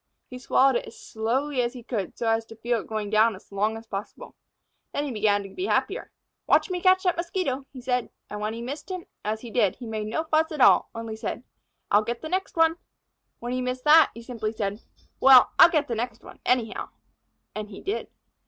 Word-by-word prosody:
He 250 - -10
swallowed 260 0 +3
it - - -6
as - - -12
slowly 255 +5 -1
as 240 0 -1
he 245 -2 -10
could, 215 -6 -4
so 235 - -2
as 225 0 +2
to 225 - -11
feel 235 +1 -1
it - - -14
going 215 -2 -3
down 220 0 +4
as 190 - -17
long 210 +3 0
as 225 - -11
possible. 205 -1 -7 0.6
Then 285 - -2
he 280 - -4
began 205 -2 +1
to 195 - -9
be 365 - -4
happier. - - -1 0.4
"Watch - - +3
me 360 -1 -2
catch 375 0 +4
that 360 -2 +2
Mosquito," 340 -6 -2
he 260 - -10
said. 250 -1 -1 0.2
And 210 0 -6
when 215 +1 -2
he 230 - -6
missed 285 +8 -6
him, 370 -2 -5 0.2
as 215 +1 -2
he 235 - -9
did, 215 -6 +2
he 250 - -10
made 215 -2 -4
no 235 +9 -1
fuss 315 0 +1
at 305 - -5
all - - +6
only 225 -1 -5
said: 220 - -5 0.5
"I'll 205 - +6
get 235 +2 -4
the 315 - -5
next 375 0 -2
one!" 325 0 +4 0.6
When 240 +1 -5
he 255 - -1
missed 250 0 -3
that 315 +2 +7
he 230 - -9
simply 225 -3 -4
said: 205 0 -3 0.4
"Well, 265 -1 +8
I'll - - +10
get 305 -3 +1
the 240 - -2
next 230 0 -4
one, - - -13
anyhow!" 240 -3 0 0.6
And 210 -1 -5
he 195 - -10
did. 400 +3 -3
240 Hz, 225 wpm, -26 LUFS, 220-285 Hz, 0.6 s, I'll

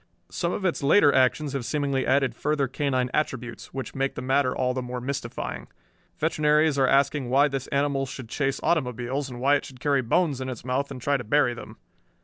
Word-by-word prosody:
Some 170 -1 -1
of 190 - -3
its 180 - 0
later 145 +1 +5
actions 135 +3 +2
have 135 -3 -2
seemingly 140 0 -1
added 135 0 +2
further 150 -2 0
canine 130 -1 -1
attributes, 125 -5 -3
which 135 0 -6
make 135 0 -1
the - - -5
matter 130 0 +1
all 125 -1 +1
the 130 - -2
more 125 0 -5
mystifying. 120 - -5 0.5
Veterinaries 150 -1 +2
are 135 - +4
asking 140 -1 +2
why 140 +3 +4
this 135 -2 -4
animal 140 -1 0
should 130 -1 -8
chase 135 +3 -1
automobiles, 130 -2 -1
and 120 -1 -8
why 140 +3 +4
it - - -8
should 130 -2 -12
carry 140 +1 +2
bones 135 +3 +1
in 130 - -3
its 125 -2 -7
mouth 130 +2 -1
and 130 -3 -8
try 140 0 +2
to 120 - -6
bury 125 +2 +2
them! 120 - -10
135 Hz, 205 wpm, -25 LUFS, 125-145 Hz, 0.5 s, later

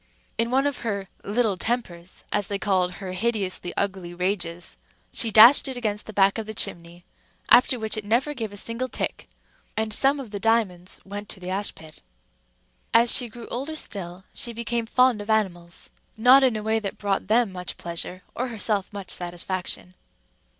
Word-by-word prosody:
In 230 +1 +2
one 265 +3 +2
of 285 -2 -1
her 200 -4 -3 0.2
little 210 -2 0
tempers, 185 -7 -4
as 205 -2 0
they 200 - -2
called 185 -3 +1
her 190 -1 -7
hideously 190 -3 -2
ugly 190 -3 -2
rages, 180 -2 -2 0.4
she 230 - 0
dashed 225 +7 +8
it 260 -2 -5
against 210 -4 -2
the - - -6
back 195 +1 +3
of 220 - -5
the 220 - -6
chimney, 170 -1 0 0.5
after 250 +1 +6
which 220 -1 +1
it 215 - -3
never 240 +8 +1
gave 225 -6 -5
a 205 - -7
single 230 +5 -2
tick; - - -4 0.5
and 220 0 -1
some 275 +5 +3
of 250 -6 -8
the 200 - -4
diamonds 195 -5 0
went 205 +1 -7
to - - 0
the 180 0 -6
ash 200 +2 -1
pit. 155 -1 -11 0.9
As 235 +1 +7
she 245 - +3
grew 235 +1 -11
older 275 +6 -4
still, 185 - -5
she 235 - -1
became 235 0 -2
fond 250 -2 +3
of 205 - -9
animals, 175 -5 -2 0.3
not 255 +4 +7
in 255 -4 +3
a 215 - -4
way 220 +1 +1
that 200 -3 -5
brought 200 -2 -1
them 225 -1 +3
much 180 -1 -6
pleasure, 175 +2 -1
or 250 - -2
herself 215 -4 -1
much 200 -2 -5
satisfaction. 180 +1 -3
210 Hz, 185 wpm, -24 LUFS, 185-235 Hz, 0.9 s, dashed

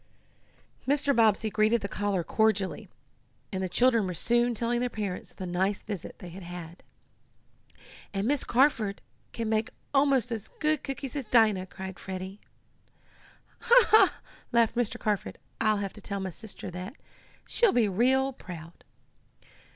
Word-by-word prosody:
Mr. 285 0 +2
Bobbsey 220 -1 +3
greeted 215 +2 +3
the 200 - -3
caller 200 -3 -1
cordially, 210 -1 0 0.6
and 190 - -2
the 185 - -2
children 235 0 +3
were 180 - -4
soon 240 +6 +2
telling 235 +2 0
their 250 0 0
parents 205 -5 -4
of - - -20
the 185 - -5
nice 190 +3 -1
visit 205 -5 -6
they 180 - -9
had 185 +3 -10
had. 175 -1 -9 1.3
"And 200 +1 -1
Miss 285 0 +1
Carford 235 -6 +2 0.3
can 230 -1 -3
make 220 0 0 0.2
almost 275 -4 +3
as 220 -3 -3
good 305 -1 +1
cookies 270 0 -5
as 275 -6 -3
Dinah!" 215 -5 +4
cried 190 0 -8
Freddie. 190 +1 -6 1.2
"Ha! 480 +1 +6
Ha!" 435 - +6 0.3
laughed 235 -2 +3
Mr. 240 -2 -1
Carford. 210 -2 -2 0.2
"I'll 215 -2 +3
have 200 -1 -3
to 210 - -10
tell 200 0 -4
my 190 -1 -3
sister 195 0 -8
that. 180 +8 -7 0.5
She'll 470 -4 +3
be 235 -3 +3
real 260 +7 +2
proud." 170 -6 -10
215 Hz, 150 wpm, -28 LUFS, 190-245 Hz, 1.3 s, Ha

